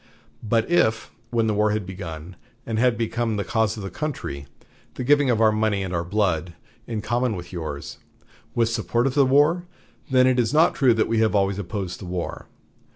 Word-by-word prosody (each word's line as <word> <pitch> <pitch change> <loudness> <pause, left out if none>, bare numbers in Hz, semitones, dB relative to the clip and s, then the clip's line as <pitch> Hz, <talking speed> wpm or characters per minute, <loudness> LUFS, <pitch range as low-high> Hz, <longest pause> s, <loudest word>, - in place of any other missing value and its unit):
But 110 +1 +1
if, 110 -11 +1 0.2
when 115 -1 +1
the 110 - +1
war 105 +1 +2
had 105 -2 -1
begun, 90 -2 -8 0.3
and 110 -1 -2
had 125 -1 +3
become 115 0 -1
the 100 - -1
cause 110 0 0
of 105 - -6
the 95 - -6
country, 85 - -5 0.5
the - - -4
giving 145 +1 +4
of 115 -3 +2
our 110 -1 +5
money 110 -2 0
and 95 -1 -4
our 85 -1 0
blood, 90 -3 -1 0.3
in 110 -3 -3
common 120 +1 0
with 90 +1 -8
yours, 80 -5 -6 0.6
was 115 -1 +1
support 120 +1 0
of 135 - +1
the 140 -1 +4
war, 150 +6 +3 0.4
then 130 -1 +5
it 130 -1 +3
is 120 +3 +1
not 165 +3 +5
true 130 -5 +3
that 110 - +1
we 115 0 +1
have 110 -1 +2
always 100 0 +1
opposed 95 -2 -4
the 95 - -8
war. 90 -1 -5
110 Hz, 205 wpm, -23 LUFS, 95-120 Hz, 0.6 s, our